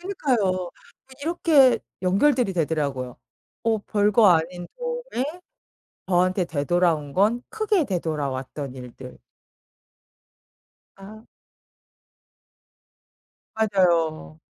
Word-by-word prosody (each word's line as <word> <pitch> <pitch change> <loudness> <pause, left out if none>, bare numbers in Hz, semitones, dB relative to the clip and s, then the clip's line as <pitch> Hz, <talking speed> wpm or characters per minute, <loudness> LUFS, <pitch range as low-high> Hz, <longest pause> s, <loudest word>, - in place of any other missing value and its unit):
그러니까요. 195 - 0 0.4
아니 265 - -16
이렇게 300 -5 +4 0.2
연결들이 200 +3 +2
되더라고요. 145 -7 -2 0.5
어 225 -1 +2
별거 210 +1 +3
아닌 175 0 +1
도움에 485 - -3 0.8
저한테 185 +1 +2
되돌아온 160 -1 0
건 215 - +2
크게 430 -6 0
되돌아왔던 145 - -4
일들. 125 0 -11 1.8
아. 210 +3 -12 2.3
맞아요. 170 - +1
185 Hz, 200 characters per minute, -24 LUFS, 155-230 Hz, 2.3 s, 이렇게